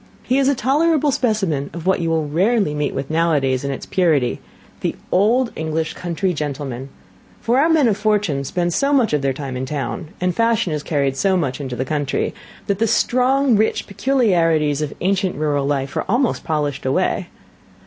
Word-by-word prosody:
He 260 +2 +1
is 270 - +2
a 280 - +3
tolerable 295 +3 +2
specimen 195 - 0
of 170 0 -7
what 190 - +2
you 165 -1 -1
will 160 -2 0
rarely 190 +3 +1
meet 150 -1 -2
with 135 +2 -4
nowadays 145 -6 +1
in 140 - -2
its 135 - -5
purity, 155 -9 +1 0.4
the - - -2 0.2
old 230 +6 +3
English 160 0 -2
country 180 +2 -2
gentleman; 140 -4 -4 0.5
for 240 +3 +1
our 315 +4 +3
men 315 -6 +4
of 210 -3 +1
fortune 205 -10 0
spend 175 +5 -1
so 280 +8 +1
much 250 - +3
of 150 - +2
their 135 -1 +1
time 135 -1 -5
in 130 +1 -3
town, 150 +3 -4
and 180 -1 0
fashion 230 -7 +1
is 150 - -2
carried 140 -3 0
so 190 +4 +2
much 145 -5 -2
into 130 -3 -4
the 130 +2 -2
country, 145 -1 -1 0.3
that 200 -1 -1
the 225 - +2
strong, 255 +3 +2
rich 215 +1 +1
peculiarities 170 - +1
of 150 -2 -2
ancient 190 0 0
rural 145 -2 0
life 135 -1 -2
are - - -1
almost 240 +3 +1
polished 145 -3 -2
away. 130 - 0
165 Hz, 190 wpm, -20 LUFS, 145-220 Hz, 0.5 s, men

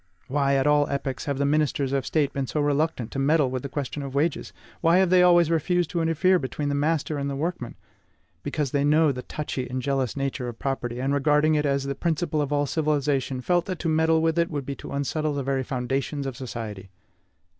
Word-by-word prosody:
Why, 140 0 +1
at 135 0 +2
all 150 -1 +3
epochs, 140 -2 -3
have 140 -2 -2
the 140 - +1
ministers 145 -2 +1
of 135 -2 -1
State 150 -3 +1
been 135 -1 -2
so 150 - -2
reluctant 145 -4 0
to 135 - -3
meddle 145 -1 +3
with 130 -1 -2
the 140 - -6
question 145 +1 -4
of 140 -1 -6
wages? 150 +2 0 0.3
Why 165 +2 +4
have 185 -1 +3
they 185 -1 +6
always 175 -2 +5
refused 170 +1 +1
to 170 - 0
interfere 165 +3 +3
between 145 +2 -3
the - - 0
master 150 0 0
and 140 0 -2
the 140 - -3
workman? 150 -4 -3 0.7
Because 150 -4 -2
they 140 -1 +1
knew 150 0 +4
the 125 - -5
touchy 135 -3 -5
and 130 +1 -3
jealous 135 -1 -1
nature 135 -2 -2
of 120 -1 -6
property, 125 -3 -3
and, 135 +2 0
regarding 150 +2 +3
it 150 -1 +1
as 140 -1 +1
the 140 0 -2
principle 160 +1 -1
of 145 -1 -2
all 145 0 +2
civilization, 140 -3 0
felt 175 +5 +1
that 185 -2 -4
to 165 - -2
meddle 160 0 +3
with 165 +1 +1
it 170 - +2
would 145 -4 -4
be 140 - -3
to - - -9
unsettle 145 +2 -1
the 140 - -2
very 135 0 0
foundations 135 +2 -2
of 135 -2 -4
society. 110 -7 -7
145 Hz, 225 wpm, -25 LUFS, 135-155 Hz, 0.7 s, they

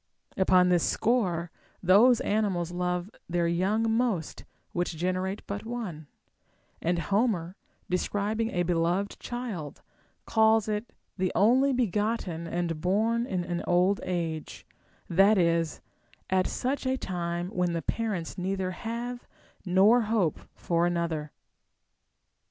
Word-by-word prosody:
Upon 185 -1 +4
this 175 -2 +3
score, 180 -8 +1 0.3
those 220 +7 +6
animals 195 -5 0
love 180 +2 -2 0.2
their 170 0 +1
young 205 +6 +1
most 225 -10 -1 0.3
which 175 -2 -2
generate 185 +3 -2
but 200 +1 -5
one; 220 -10 -5 0.7
and 175 +1 +1
Homer, 190 -1 0 0.3
describing 205 +5 -1
a 175 -5 0
beloΛ^ed 175 +3 0
child, 225 - -6 0.4
calls 220 -1 +3
it 215 +2 -3 0.3
the 185 -1 +1
only 255 +7 +4
begotten 210 -7 -1
and 170 -2 -2
born 225 +6 +1
in 175 -3 -2
old 180 +3 +3
age, 165 -3 -4 0.2
— - - -34
that 195 +5 +5
is, 170 -2 +1 0.5
at 185 -1 +3
such 260 +1 -2
a 260 0 +1
time 175 -3 -3
when 180 -4 0
the 165 -2 -2
parents 200 -6 -3
neither 190 0 -1
have 235 +5 -5 0.4
nor 200 +7 +5
hope 200 -9 +1 0.2
for 170 0 +1
another. 165 -3 -2
185 Hz, 120 wpm, -28 LUFS, 175-220 Hz, 0.7 s, those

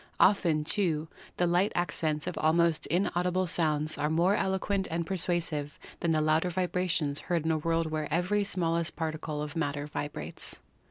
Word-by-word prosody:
Often, 170 -6 +4
too, 160 -2 +1 0.3
the 180 - +2
light 175 +4 +2
accents 155 -3 -1
of - - -3
almost 165 0 +2
inaudible 180 +1 +1
sounds 155 -3 +1
are 150 - +1
more 170 +5 +3
eloquent 190 0 0
and 165 +1 -2
persuasive 165 -5 -1 0.2
than 170 - 0
the 155 -1 +2
louder 155 +3 +2
vibrations 175 -4 0
heard 170 -3 +1
in 160 - +2
a 160 - +1
world 165 0 0
where 155 -1 -3
every 180 +6 +1
smallest 170 -4 0
particle 155 -2 -3
of 150 +2 -7
matter 145 -3 -1
vibrates. 145 0 -5
165 Hz, 160 wpm, -29 LUFS, 155-180 Hz, 0.3 s, Often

